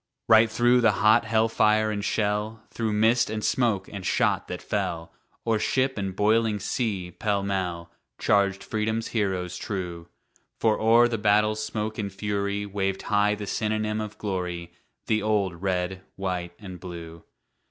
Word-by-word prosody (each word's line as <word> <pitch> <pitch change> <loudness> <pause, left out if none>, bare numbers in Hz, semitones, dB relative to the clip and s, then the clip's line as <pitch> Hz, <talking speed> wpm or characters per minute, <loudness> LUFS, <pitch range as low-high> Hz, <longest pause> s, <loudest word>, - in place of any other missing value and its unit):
Right 110 0 +6
through 120 +2 +3
the 110 -3 +4
hot 110 +3 +4
hell 110 0 +2
fire 110 -1 +2
and 100 -1 -3
shell, 105 +1 -1
Through 115 -2 -2
mist 110 +3 +3
and 110 0 -3
smoke 110 -7 +1
and 100 -2 -7
shot - - +1
that - - -5
fell 80 -1 -3 0.3
O'er 115 -2 +2
ship 130 +4 +1
and 95 -2 -3
boiling 110 +1 +2
sea, 100 -4 -2
pell 100 0 -1
mell, 90 -4 -3 0.3
Charged 100 -1 +2
Freedom's 110 +1 -2
heroes 95 -5 -1
true. 90 -4 -5 0.5
For 110 -1 +2
o'er 115 +2 +5
the 115 -2 -2
battle's 105 +1 +2
smoke 110 0 -3
and 100 -1 -3
fury 100 0 -2
Waved 95 -1 -2
high 105 0 +2
the 105 0 -6
synonym 110 +1 -1
of 105 -1 -6
glory, 90 -4 -4 0.3
The 110 -1 +1
old 100 -5 0
"Red, 95 -1 -1
White 90 -2 -3
and 95 -4 -9
Blue." 85 -2 -9
105 Hz, 155 wpm, -26 LUFS, 95-110 Hz, 0.5 s, Right